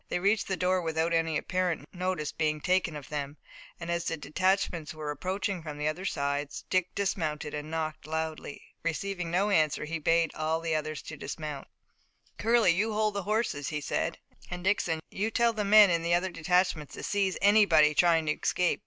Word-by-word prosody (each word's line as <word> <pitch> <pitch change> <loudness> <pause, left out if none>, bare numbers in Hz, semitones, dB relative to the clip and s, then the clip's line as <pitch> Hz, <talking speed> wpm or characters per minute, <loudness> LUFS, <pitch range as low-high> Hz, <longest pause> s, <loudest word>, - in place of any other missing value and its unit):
They - - 0
reached 200 +4 +1
the 190 - -1
door 185 0 +1
without 165 0 0
any 165 -1 +1
apparent 180 -2 -1
notice 180 -4 -2
being 155 -1 -1
taken 180 -1 +1
of 145 -2 -8
them, 145 0 -4 0.4
and 170 0 -4
as 170 -1 -1
the 165 - -2
detachments 175 -1 0
were 155 -1 -4
approaching 185 +4 -3
from 150 -2 -7
the 150 0 -1
other 165 +5 -3
sides, 140 -3 -2
Dick 185 -1 +1
dismounted 155 -7 -2
and 150 +1 -5
knocked 155 -1 -4
loudly. 160 -2 -4 0.2
Receiving 180 +1 -3
no 195 +5 +1
answer, 155 -5 +2
he 165 +2 -3
bade 165 +1 +2
all 155 +1 -1
the 165 -1 -2
others 155 -1 -2
dismount. 150 -2 -6 0.7
"Curley, 230 -4 +4
you 210 +6 0
hold 215 0 +1
the 200 - -2
horses," 210 - -1
he 150 - -2
said, 145 - -2 0.3
"and 180 0 -6
Dixon, 180 -5 +1
you 210 +3 -1
tell 235 0 +2
the 215 -1 -1
men 205 -1 +7
in 170 -1 +1
the 170 +1 +2
other 185 +2 0
detachments 180 -2 0
to - - -8
seize 195 -2 0
anybody 190 -7 +5
trying 165 0 +4
to 150 - +1
escape. 180 +3 0
170 Hz, 190 wpm, -29 LUFS, 155-190 Hz, 0.7 s, men